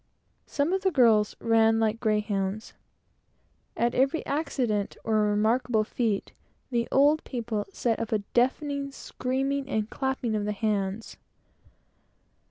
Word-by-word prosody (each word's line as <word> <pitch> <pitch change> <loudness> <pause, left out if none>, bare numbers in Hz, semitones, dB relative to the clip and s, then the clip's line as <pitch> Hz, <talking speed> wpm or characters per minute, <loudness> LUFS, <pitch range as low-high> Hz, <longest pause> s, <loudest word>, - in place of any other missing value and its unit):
Some 295 +5 0
of 385 - 0
the 385 - +2
girls 230 - +4
ran 225 -1 +3
like 220 0 +1
greyhounds. 210 -2 -1 1.0
At 235 +1 +1
every 275 +5 +1
accident, 250 -9 -1
or 215 -1 +2
remarkable 220 +2 +2
feat, 215 -2 -2 0.4
the 235 -1 0
old 290 +3 +4
people 225 -5 -3
set 230 +3 -1
up 230 - -4
a 220 - +3
deafening 275 +6 0
screaming 270 +1 -3
and 220 -3 -1
clapping 265 -4 -2
of 210 -1 -1
hands. 210 0 -2
230 Hz, 120 wpm, -27 LUFS, 215-265 Hz, 1.0 s, girls